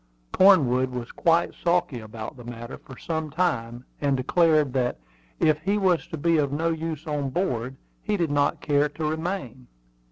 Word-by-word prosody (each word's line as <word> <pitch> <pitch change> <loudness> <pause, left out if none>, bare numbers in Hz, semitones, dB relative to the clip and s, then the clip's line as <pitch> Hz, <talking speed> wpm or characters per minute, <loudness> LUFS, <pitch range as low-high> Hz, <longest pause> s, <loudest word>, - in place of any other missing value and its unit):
Cornwood 130 -10 +5
was 125 -2 -6
quite 170 0 +2
sulky 170 -7 +1
about 110 0 -8
the 125 - -12
matter 120 0 -8
for 130 -4 -13
some 160 -2 -3
time, 125 -7 -1 0.2
and 140 -2 +2
declared 155 0 +3
that, 125 - 0 0.4
if 155 -1 +2
he 200 +5 +1
was 185 -4 +1
to 160 - -6
be 165 +2 +2
of 140 -2 0
no 160 +4 0
use 160 -1 -4
on 145 -3 -2
board 130 -5 -2 0.3
he 210 -1 -1
did 170 -5 0
not 145 0 +1
care 145 0 +2
to 155 +2 -5
remain. 155 - -4
150 Hz, 170 wpm, -25 LUFS, 130-165 Hz, 0.4 s, Cornwood